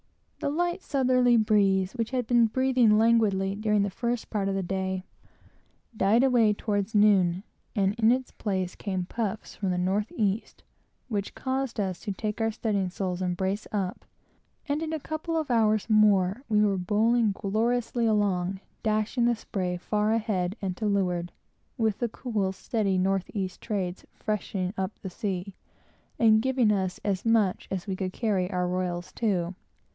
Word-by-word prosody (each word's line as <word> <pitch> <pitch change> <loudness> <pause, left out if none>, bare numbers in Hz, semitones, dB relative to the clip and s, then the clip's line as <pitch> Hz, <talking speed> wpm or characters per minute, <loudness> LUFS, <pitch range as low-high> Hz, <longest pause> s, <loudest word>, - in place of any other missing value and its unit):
The - - -1
light 350 +5 -1
southerly 255 -4 +3
breeze, 200 -4 +3
which 230 -3 -2
had 255 -2 -1
been 235 -1 +4
blowing 250 -2 +3
languidly 215 -4 +3
during 210 0 +1
the 200 - -2
first 240 +3 -3
part 200 -3 0
of 195 - -1
the 195 - -1
day, 190 0 -2 0.9
died 215 +5 +3
away 240 -5 +4
toward 205 0 -2
noon, 195 -3 +4 0.3
and 195 -2 +2
in 225 0 +5
its 255 +1 -1
place 190 -3 -2
came 185 -3 -3
puffs 220 +1 -4
from 195 - -2
the 180 - 0
north 195 +4 0
east, 210 0 -2 0.4
which 205 -5 -3
caused 260 -3 -2
us 190 -3 -1
to 205 - -4
take 210 +3 -3
our 225 - +2
studding 205 -4 -1
sails 180 -1 -3
in 185 - 0
and 175 0 -2
brace 195 +3 -2
up; 195 -3 -2 0.6
and 290 +1 -1
in 320 -1 -3
a 315 - -2
couple 315 +3 -3
of 310 -5 -2
hours 215 -3 +2
more, 210 -1 +4
we 210 -1 +4
were 200 -2 +1
bowling 220 +4 +2
gloriously 230 +4 0
along, 195 -3 +1 0.2
dashing 215 +2 +1
the 240 0 +3
spray 185 -5 -3
far 210 +4 0
ahead 205 -5 0
and 190 -2 -3
to 215 - -1
leeward, 180 -4 0 0.5
with 220 -4 0
the 240 - 0
cool, 215 -5 -2
steady 195 0 -1
north 190 0 0
east 190 -3 -3
trades, 190 -5 -3
freshening 195 -3 -2
up 190 +2 -3
the 190 - -5
sea, 195 -2 -4 0.6
and 220 -2 +5
giving 255 -3 +2
us 190 -3 -1
as 195 -2 0
much 225 -5 +2
as 190 -1 -3
we 195 - -3
could 185 -1 -3
carry 195 -6 0
our 180 -2 -1
royals 180 -1 -2
to. 190 -6 -1
210 Hz, 170 wpm, -27 LUFS, 190-230 Hz, 0.9 s, in